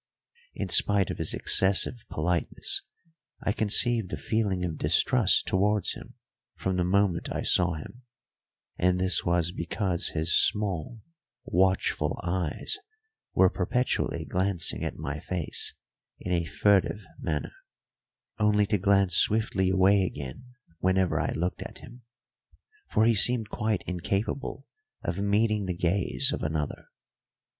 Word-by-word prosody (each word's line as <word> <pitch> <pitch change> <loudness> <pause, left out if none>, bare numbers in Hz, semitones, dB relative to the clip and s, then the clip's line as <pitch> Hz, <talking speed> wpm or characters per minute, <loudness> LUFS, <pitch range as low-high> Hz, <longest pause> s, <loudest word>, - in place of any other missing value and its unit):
In - - -4
spite 100 -3 +3
of - - -7
his - - 0
excessive 100 +5 +3
politeness 85 +2 -2 0.6
I - - +1
conceived 110 0 +3
a - - -3
feeling 100 -5 -1
of 80 -3 -5
distrust - - +3
towards 100 +1 +1
him - - -12 0.4
from 95 -1 -2
the 90 - +1
moment 95 -1 0
I - - -3
saw 90 -2 +2
him; 100 +11 -10 0.8
and 90 0 +2
this 90 -3 +2
was 85 0 +1
because 90 0 -2
his 80 +1 +2
small, 105 +1 0 0.4
watchful 95 +2 0
eyes 90 - -2 0.6
were 95 -1 +5
perpetually 125 +7 -1
glancing 95 -2 -1
at - - -4
my - - -5
face 85 -6 -3 0.4
in - - -5
a 85 -2 0
furtive 100 +2 +1
manner, 75 -5 -3 0.9
only 105 -1 +3
to 105 0 0
glance 100 -2 +3
swiftly 105 -3 +2
away 95 +2 +4
again 75 - -5 0.3
whenever 95 0 +1
I - - -1
looked 90 +2 -3
at - - -8
him; 120 +1 -14 0.9
for 110 - +2
he 115 - +4
seemed 110 +2 +3
quite 110 -2 -1
incapable 100 +10 -3 0.4
of 95 - -3
meeting 105 0 +1
the 90 -2 -3
gaze 90 +2 +1
of - - -4
another. 75 -1 -3
95 Hz, 130 wpm, -27 LUFS, 90-105 Hz, 0.9 s, were